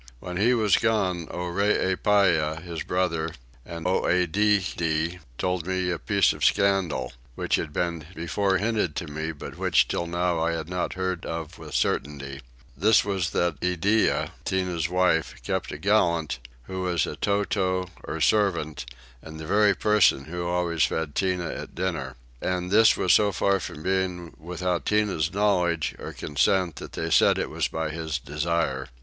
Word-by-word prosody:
When 90 +4 -6
he 120 +6 +3
was 105 -4 +3
gone 95 -7 0
Oreepyah, 95 -3 +1
his 85 -3 -5
brother, 85 -3 -1 0.3
and 85 +2 -8
Oedidde, 90 -2 +1 0.2
told 90 -2 -1
me 95 -1 0
a 85 - -2
piece - - +2
of - - -7
scandal, 100 -4 +2 0.2
which - - -3
had 75 - -4
been 85 -1 -2
before 95 +4 0
hinted 105 -5 0
to - - -3
me 80 +2 -4
but 75 - -9
which - - +3
till 85 - -2
now 85 0 0
I 85 +1 +1
had 80 -2 -4
not 90 0 -2
heard 95 -2 -2
of 80 -1 -5
with - - -8
certainty: 70 -1 -1 0.3
this 105 +8 +4
was 95 -4 -1
that 85 -4 0
Iddeah, 90 +5 +1
Tinah's 90 -3 -1
wife, 90 -3 +1
kept - - -2
a - - -5
gallant, 85 -8 +1 0.2
who 95 +6 -5
was 90 -2 +1
a - - -5
towtow, 95 -2 0 0.2
or 80 - -5
servant, 80 - +1 0.3
and 80 0 -10
the 80 - -6
very 100 +3 +4
person 105 -10 +3
who 85 +2 -4
always 85 -2 0
fed 80 -3 -1
Tinah 90 -1 -1
at - - -8
dinner: 80 -8 -3 0.3
and 90 0 -2
this 110 +2 +6
was 90 - +3
so 105 -1 +4
far 100 +1 +1
from 75 -3 -7
being 90 -2 -1
without 90 +1 -2
Tinah's 100 -6 +1
knowledge 90 -5 +1
or - - -6
consent 85 +3 0
that - - -8
they - - -3
said - - +5
it - - -2
was - - 0
by 80 -1 -3
his 80 -1 -3
desire. 75 -1 -2
90 Hz, 160 wpm, -26 LUFS, 80-95 Hz, 0.3 s, this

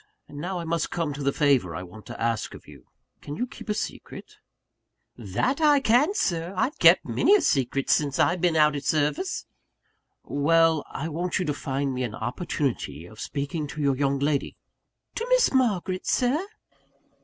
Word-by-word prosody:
And 145 - -10
now 180 +4 -3
I 170 - -4
must 165 -1 -1
come 165 -4 -2
to 145 - -7
the 140 0 +1
favour 135 - +2
I 90 - -5
want 95 +4 -13
to - - -8
ask 115 -1 -1
of - - -14
you: - - -15 0.3
can 145 - -7
you 245 - -1
keep 235 - -12
a 210 - +1
secret?" - - -7 0.8
"That 120 - -1
I 295 -2 +5
can, 270 - +3
Sir! 175 - -1
I've 270 +9 0
kep' - - +6
a - - -6
many 415 +1 +4
secrets 135 -1 +1
since 145 -3 0
I've 175 0 +2
been 175 -2 +2
out 150 -1 +4
at 140 - -4
service." 155 - 0 0.8
"Well: 160 +2 +3
I 150 - -4
want 170 +3 -2
you 185 - -1
to 150 - 0
find 135 -1 -2
me 130 - -3
an 115 -4 -3
opportunity 120 - -3
of 110 +4 -14
speaking 145 +2 -3
to 150 - -6
your 140 -1 +2
young 140 0 +1
lady 140 0 -1 0.3
" - - -52
"To 465 - -2
Miss - - +4
Margaret, 195 -8 0
Sir?" 280 +10 +1
150 Hz, 190 wpm, -25 LUFS, 140-185 Hz, 0.8 s, kep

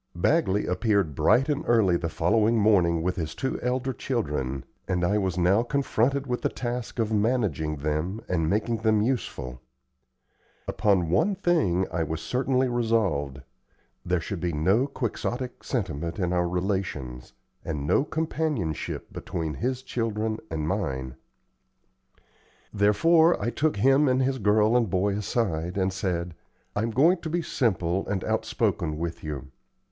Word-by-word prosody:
Bagley 105 - +2
appeared 95 -3 +1
bright 125 - +3
and 150 -1 -1
early 110 -7 +4
the 85 -1 -1
following 105 +7 +2
morning 90 -6 +3
with 90 +1 -1
his 80 -2 -3
two 130 - -3
elder 130 +1 -1
children, 70 - -2 0.2
and 90 -1 0
I 105 +4 +2
was 95 -3 -1
now 90 +5 +4
confronted 140 +1 0
with 125 -2 -2
the - - +1
task 120 -1 -4
of 110 -2 0
managing 105 - 0
them 75 +7 -2
and 80 -3 0
making 110 +3 0
them 110 -1 +2
useful. 65 - -3 1.1
Upon 95 -6 +1
one 175 - +2
thing 155 - +2
I 85 -1 -1
was 80 0 -2
certainly 130 +6 0
resolved 105 - 0 0.6
there 90 0 0
should 95 +3 -5
be 90 0 -1
no 95 - +2
quixotic 125 -1 -4
sentiment 85 - -3
in 90 -3 0
our 90 -1 +1
relations, 90 -9 -3 0.3
and 75 -3 -3
no 105 - +3
companionship 155 - -2
between 80 -3 -4
his 125 - -2
children 110 -3 -2
and 75 -2 -3
mine. 65 -10 -2 1.6
Therefore, 160 +12 +4
I 120 - -1
took 150 +6 0
him 135 +7 +4
and 130 0 +3
his 130 0 0
girl 105 +2 +3
and 120 -4 +2
boy 100 +2 +1
aside, 95 -5 -1
and 95 -1 +1
said: 90 -3 -2 0.4
"I'm 110 +3 0
going 155 +11 +4
to 165 - -5
be 170 +1 -1
simple 95 - 0
and 100 -3 -2
outspoken 75 -2 -1
with 85 +1 -4
you. 70 -4 -6
100 Hz, 145 wpm, -26 LUFS, 85-125 Hz, 1.6 s, early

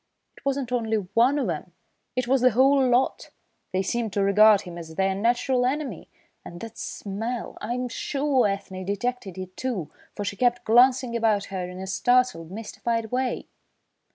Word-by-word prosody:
It - - -18
wasn't 275 -3 -1
only 225 -3 0
one 230 +8 +2
of 270 -6 0
'em, 170 +1 -4 0.4
it 255 -1 -1
was 265 0 +3
the 255 - +6
whole 265 +3 +4
lot. 250 +2 +1 0.4
They 185 +1 0
seemed 230 +2 -1
to 200 - +1
regard 205 +1 +6
him 175 -2 -9
as 160 -1 -9
their 190 +2 +1
natural 240 +5 +1
enemy! 260 - -2 0.3
And 175 - -9
that 225 -1 -8
smell! 225 +4 -4
I'm 245 +3 -2
sure 270 0 +1
Ethne 195 -1 -4
detected 200 -1 -3
it 185 0 -7
too, 230 - -3 0.2
for 205 - -4
she 200 - -3
kept 245 0 +1
glancing 245 +1 +4
about 220 -3 +2
her 180 -1 -3
in 180 0 -8
a 190 - -5
startled, 245 -3 +1
mystified 225 +2 -3
way." 255 0 -1
230 Hz, 170 wpm, -25 LUFS, 195-250 Hz, 0.4 s, the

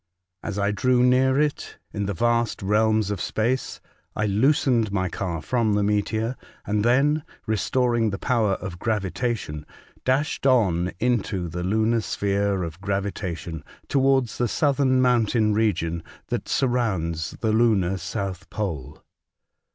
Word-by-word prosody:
As 105 -2 -4
I 100 0 +1
drew 125 +4 +2
near 130 +2 +4
it, 150 -1 -1 0.2
in 100 -2 -2
the 100 - -2
vast 120 +1 +1
realms 110 +1 +2
of 105 - -3
space, 120 +4 -1 0.4
I 105 - 0
loosened 115 +1 +2
my 95 -2 0
car 85 -2 -4
from 115 -1 +1
the 105 - +2
meteor, 110 +4 0 0.3
and 105 +1 0
then, 140 +6 +3 0.2
restoring 120 +1 +1
the 100 - -3
power 110 -3 +1
of 95 -2 -6
gravitation, 105 -6 -2 0.4
dashed 135 +1 0
on 95 -9 +3
into 105 -6 0
the 85 +2 -5
lunar 110 +4 +1
sphere 100 -2 0
of 85 +2 -7
gravitation 95 -5 -3 0.2
towards 135 -3 +2
the 120 - +2
southern 135 -2 +2
mountain 115 -3 +2
region 85 -6 0 0.3
that - - -3
surrounds 95 -11 0
the 110 - 0
lunar 105 -5 +3
South 95 0 -4
Pole. 85 -12 -5
110 Hz, 135 wpm, -24 LUFS, 95-120 Hz, 0.4 s, near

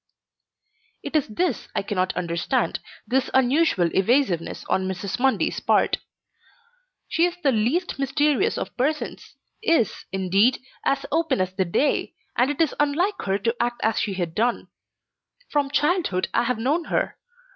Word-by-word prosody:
It - - -6
is 300 - +2
this 350 +12 -1
I - - 0
cannot 185 -3 -1
understand, 170 +9 -1 0.3
this 260 +2 +1
unusual 265 - +3
evasiveness 195 - +1
on 190 0 0
Mrs. 190 +3 -4
Mundy's 265 +1 +1
part. - - +2 1.1
She 330 - +2
is 355 0 -6
the 275 - +4
least 265 - 0
mysterious 295 - +1
of - - -5
persons, 300 +5 -2 0.3
is, 330 - +1
indeed, 195 +6 +3 0.3
as 275 0 0
open 325 - +1
as 185 0 -1
the 190 0 0
day, 220 +12 0 0.2
and 250 +3 +3
it 290 - -3
is 325 -3 +2
unlike 340 +8 +1
her 195 0 +1
to 230 +4 -1
act 240 0 -1
as 220 0 +2
she 195 - -1
has 175 -3 -1
done. 230 +8 -1 0.8
From 290 -2 +1
childhood 295 - +1
I - - +2
have 250 -1 0
known 290 +9 0
her. - - -1
250 Hz, 150 wpm, -24 LUFS, 195-295 Hz, 1.1 s, the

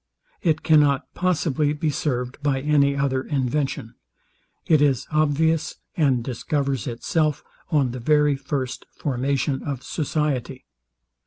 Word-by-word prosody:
It 160 -5 +1
cannot 145 -3 +3
possibly 155 -5 +1
be 150 +1 -1
served 125 -2 -2
by 140 -2 +1
any 140 -1 +3
other 135 -1 0
invention. 135 -3 -2 0.7
It 155 -2 +4
is 135 -4 +2
obvious, 155 +2 +1 0.2
and 135 -7 +2
discovers 135 0 -2
itself 150 +5 0 0.3
on 145 -7 +2
the 125 - -6
very 150 +3 +3
first 135 -2 -4
formation 135 0 -1
of 135 -3 -4
society. 140 -4 -2
140 Hz, 115 wpm, -23 LUFS, 130-150 Hz, 0.7 s, It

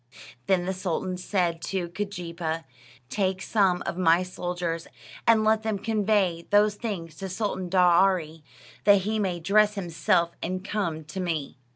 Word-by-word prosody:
Then 185 -2 +2
the 190 - -1
sultan 185 0 -2
said 180 -2 -1
to 185 -3 -2
Keejeepaa, 170 -4 -4 0.5
"Take 190 -2 0
some 195 -3 +1
of 180 - -3
my 170 0 +4
soldiers, 175 -2 -4 0.4
and 225 -1 +5
let 220 0 +3
them 220 -2 -1
convey 205 -5 0
these 205 0 +5
things 200 -7 -5
to 195 - -5
Sultan 190 -2 -3
Daaraaee, 175 -3 +3 0.4
that 200 -1 +6
he 215 +3 -1
may 185 -4 -1
dress 210 +5 +3
himself 170 -2 +1
and 185 +2 -3
come 170 -7 -2
to 155 +5 -7
me." 160 -8 -3
185 Hz, 150 wpm, -26 LUFS, 170-205 Hz, 0.5 s, that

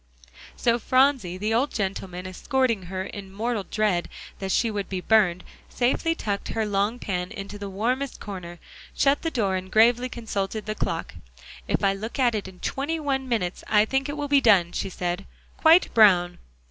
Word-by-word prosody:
So 235 0 +2
Phronsie, 255 -8 +2
the 210 +3 -1
old 255 +6 +2
gentleman 190 -3 -4
escorting 225 +1 -1
her 185 +1 -3
in 195 0 -8
mortal 220 0 -2
dread 210 -5 0 0.3
that 195 -1 -3
she 230 +3 +2
would 205 -2 -4
be 190 - -2
burned, 185 -3 +3 0.3
safely 265 +7 0
tucked 205 -9 -3
her 220 -1 -1
long 205 +3 0
pan 180 -6 -3
into 200 +1 -7
the 200 -1 -5
warmest 245 +8 -2
corner, 180 -4 -7 0.4
shut 280 +1 +3
the 325 - -1
door, 205 -10 0
and 185 0 -7
gravely 240 +3 +4
consulted 215 -3 -4
the 215 - -2
clock. 165 -5 -3 0.5
"If - - 0
I 195 0 +4
look 215 +4 -6
at 250 -3 +3
it 210 -3 -3
in 185 -1 -13
twenty 295 +4 -2
one 270 -3 -2
minutes, 190 -7 -1
I 210 0 +4
think 270 +4 -1
it 290 - -4
will 290 0 -2
be 280 -1 +4
done," 190 -8 +5
she 195 - -3
said, 180 +1 -3 0.3
"quite 330 +2 +5
brown." 180 -5 +5
210 Hz, 185 wpm, -25 LUFS, 190-245 Hz, 0.5 s, done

